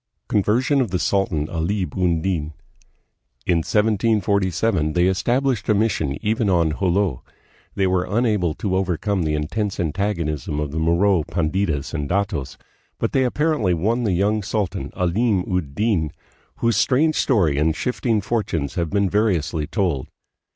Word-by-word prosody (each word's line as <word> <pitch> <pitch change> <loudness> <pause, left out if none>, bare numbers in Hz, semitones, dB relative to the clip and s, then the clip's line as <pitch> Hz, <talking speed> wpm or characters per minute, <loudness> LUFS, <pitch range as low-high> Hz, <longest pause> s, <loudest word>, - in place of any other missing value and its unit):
Conversion 120 +7 +2
of 120 - -1
the 90 - 0
Sultan 90 -6 0
Alim 90 0 -2
ud 85 -3 +1
Din. 80 -5 -2 0.9
In 85 - +2
1747 100 -3 +1
they 90 0 +3
established 120 +4 0
a 105 - +4
mission 95 -10 0
even 110 0 +1
on 85 -4 +1
Jolo. 95 -7 0 0.5
They 95 - +1
were 90 -1 +1
unable 105 -7 +1
to 95 0 -2
overcome 95 +1 0
the 75 -2 0
intense 95 +7 -2
antagonism 80 -5 -2
of 75 -2 -3
the 80 - -3
Moro 85 +3 +3
panditas 80 -2 -1
and 75 -3 -3
datos, 95 -7 -2 0.4
but - - -1
they 130 -1 +2
apparently 125 - +1
won 115 +9 0
the 105 -5 +1
young 105 +4 +1
sultan, 100 -2 -2
Alim 95 +3 +1
ud 80 -7 -2
Din, 95 -8 +1 0.4
whose 115 -3 +1
strange 150 +8 +3
story 85 - +2
and 80 +1 +2
shifting 115 +1 0
fortunes 100 -9 -2
have 85 -2 -1
been 100 +1 +1
variously 90 -7 0
told. 90 - -1
95 Hz, 145 wpm, -22 LUFS, 80-105 Hz, 0.9 s, a